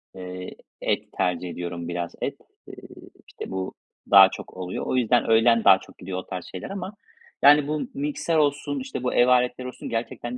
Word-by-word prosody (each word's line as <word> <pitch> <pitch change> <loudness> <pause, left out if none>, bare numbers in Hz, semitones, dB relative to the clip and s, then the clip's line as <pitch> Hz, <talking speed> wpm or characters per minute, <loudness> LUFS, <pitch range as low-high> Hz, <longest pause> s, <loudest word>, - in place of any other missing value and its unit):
eee, 90 0 -8 0.3
et - - -1
tercih 90 0 -1
ediyorum 85 -1 -5
biraz 85 0 -4
et. - - -3 0.3
Eee, - - -10 0.5
işte - - -9
bu 95 0 -4 0.4
daha - - +9
çok - - -9
oluyor. 90 0 -4
O - - -1
yüzden 120 -1 +2
öğlen 115 0 +4
daha 95 - +7
çok - - -16
gidiyor 90 0 -6
o 95 - -5
tarz 90 -2 -6
şeyler 95 - -8
ama, 195 0 -6 0.5
yani, 145 0 +6
bu 150 0 -1
mikser 280 - -2
olsun, 145 - 0
işte, 260 - -6
bu 125 - -1
ev 120 - +4
aletleri 125 0 +2
olsun 125 - -8
gerçekten 120 +1 -4
120 Hz, 185 wpm, -24 LUFS, 90-145 Hz, 0.5 s, daha